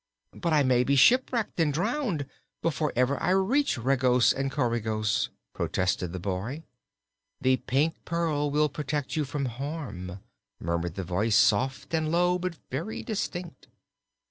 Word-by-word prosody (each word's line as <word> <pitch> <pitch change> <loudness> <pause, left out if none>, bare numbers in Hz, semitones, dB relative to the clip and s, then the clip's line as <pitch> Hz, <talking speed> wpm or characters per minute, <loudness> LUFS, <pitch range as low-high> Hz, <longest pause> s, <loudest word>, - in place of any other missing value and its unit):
"But 170 - -2
I 150 -2 +4
may 125 -2 +3
be 140 +2 +2
shipwrecked 235 - +3
and 160 -3 +3
drowned, 175 - -1 0.4
before 155 -2 0
ever 125 +3 +1
I 175 - +1
reach 205 - +2
Regos 125 0 +3
and 135 0 -2
Coregos," 110 -4 0 0.2
protested 90 -1 -1
the 90 - -5
boy. 100 - -3 0.8
"The 130 0 +3
Pink 135 +6 0
Pearl 160 -3 0
will 150 +1 +3
protect 145 -1 -3
you 155 -2 0
from 140 +1 -3
harm," 125 - -5 0.4
murmured 85 0 -2
the 95 - -3
voice, 100 +5 +1
soft 130 +10 +2
and 160 -1 +1
low 180 +1 +2
but 180 -2 -3
very 165 +12 -4
distinct. 175 - -4
140 Hz, 145 wpm, -28 LUFS, 120-165 Hz, 0.8 s, I